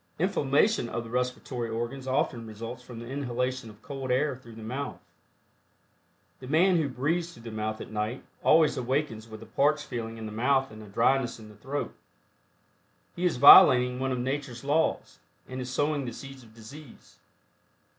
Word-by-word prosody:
Inflammation 160 - +2
of 120 - -3
the 115 - -10
respiratory 125 -1 -2
organs 120 +4 -4
often 120 -3 -1
results 115 +3 -7
from 125 -1 -11
the 115 - -7
inhalation 125 -2 -3
of 105 +1 -16
cold 135 -2 -6
air 135 +2 +1
through 120 -3 -14
the 110 - -10
mouth. 130 +5 -4 1.4
The 130 - -10
man 175 +6 +4
who 155 -4 0
breathes 165 +7 -1
through 115 - -15
the 115 - -7
mouth 110 0 -3
at - - -9
night, 110 +4 -3 0.2
always 155 -2 +5
awakens 125 -3 -2
with 110 0 -9
a - - -12
parched 150 +6 +1
feeling 115 -3 -5
in 110 - -7
the 110 - -6
mouth 130 +4 +1
and 110 0 -11
a 105 - -11
dryness 120 +5 +1
in 110 -1 -12
the 105 - -14
throat. 135 +7 -4 1.2
He 180 - -2
is 175 - +1
violating 125 -3 +8
one 135 0 -1
of 130 - -1
nature's 130 -1 -3
laws, 145 - 0 0.3
and 130 0 -6
is 125 - -5
sowing 145 +2 0
the 120 - -5
seeds 135 +2 -10
of 110 -2 -18
disease. 120 +5 -14
125 Hz, 180 wpm, -28 LUFS, 115-140 Hz, 1.4 s, violating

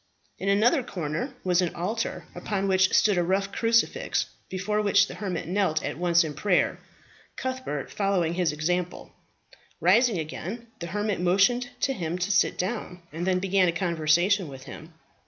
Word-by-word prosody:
In 195 - -1
another 230 +9 +4
corner 195 - -4
was 180 -1 +2
an 175 - -2
altar, 220 +7 -3
upon 195 -2 -2
which 190 -1 +3
stood 205 -4 +4
a - - +2
rough 195 +3 0
crucifix, 230 - +1 0.2
before 210 +3 -1
which 205 -2 +4
the - - -9
hermit 185 -6 -4
knelt 180 -4 0
at - - -3
once 170 -1 +4
in 155 -2 -4
prayer, 180 +5 +1 0.6
Cuthbert 260 - -4
following 195 -5 0
his 175 -1 +1
example. 175 +4 -2 0.7
Rising 215 +5 +4
again, 180 +8 -5
the 170 - -5
hermit 205 +1 -2
motioned 200 +8 +3
to 270 - +1
him 175 -5 -3
to 180 +3 -1
sit 185 - +2
down, 185 -3 -4
and 170 +3 -3
then 185 -1 +3
began 190 0 +2
a - - +3
conversation 170 +2 +1
with 135 -2 -10
him. 160 +4 -10
185 Hz, 165 wpm, -26 LUFS, 170-210 Hz, 0.7 s, another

